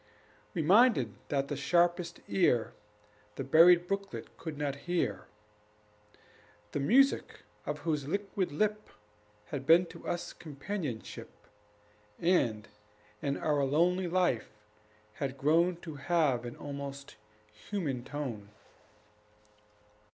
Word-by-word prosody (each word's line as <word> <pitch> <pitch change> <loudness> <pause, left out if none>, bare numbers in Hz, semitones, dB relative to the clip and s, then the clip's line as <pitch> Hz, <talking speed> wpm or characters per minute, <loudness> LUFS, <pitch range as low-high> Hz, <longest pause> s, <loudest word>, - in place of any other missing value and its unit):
We 165 - 0
minded 190 - +5 0.2
that 140 -1 0
the 145 - -3
sharpest 170 +5 +1
ear 125 -11 +2 0.6
The 135 - -4
buried 170 +5 +6
brooklet 195 0 -4
could 160 -3 -7
not 145 -2 -2
hear, 175 -1 -1 1.4
The - - -2
music 265 - +3 0.3
of 150 +1 -2
whose 150 -3 -1
liquid 195 +1 -2
lip 210 +7 -1 0.6
Had 135 +2 -5
been 170 +2 +7
to 170 0 -11
us 175 - -3
companionship, 145 - -6 0.9
And, 120 -12 +1 0.5
in 140 -1 -1
our 150 -2 +1
lonely 175 +6 +2
life, 175 -9 +1 0.6
had 135 +3 -4
grown 165 +6 +3
To 155 -3 -8
have 140 -5 +1
an 120 - -6
almost 140 -1 -7 0.4
human 135 - -4
tone. 125 -9 -5
155 Hz, 105 wpm, -31 LUFS, 140-180 Hz, 1.4 s, been